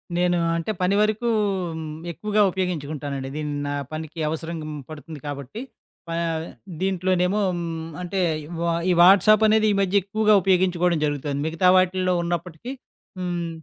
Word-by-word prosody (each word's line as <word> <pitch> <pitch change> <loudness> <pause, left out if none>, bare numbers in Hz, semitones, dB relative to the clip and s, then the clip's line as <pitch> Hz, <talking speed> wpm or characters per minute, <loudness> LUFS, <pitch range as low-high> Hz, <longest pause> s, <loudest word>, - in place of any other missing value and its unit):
నేను 175 0 +2 0.2
అంటే, 170 +6 -2
పని 185 +2 +2
వరకు 215 +3 +1 0.5
హ్మ్. 155 -1 -6 0.2
ఎక్కువగా 210 +4 0
ఉపయోగించుకుంటానండి. 145 -7 -3
దీన్ని 150 -1 -3
నా 145 - -2 0.2
పనికి 160 +1 -6
అవసరంగ 160 0 -4 0.3
పడుతుంది 155 0 -9
కాబట్టి, 140 - -6 0.5
ఆహ్, 165 -1 -1 0.4
దీంట్లోనేమో 185 +1 +1 0.2
హ్మ్. 165 -1 -4
అంటే 190 +2 -3 0.2
ఈ - - -10 0.2
వా 170 0 +1 0.3
వాట్సాపనేది 215 +4 +6
ఈ - - +2
మధ్య 195 +1 +2
ఎక్కువగా 215 +2 +2
ఉపయోగించుకోవడం 180 -3 +2
జరుగుతుంది. 145 -1 -2
మిగతా 165 +3 +3
వాటిల్లో 185 0 +2
ఉన్నప్పటికీ 175 - -4 0.5
హ్మ్. 175 -2 -2
175 Hz, 130 wpm, -23 LUFS, 160-190 Hz, 0.5 s, వాట్సాపనేది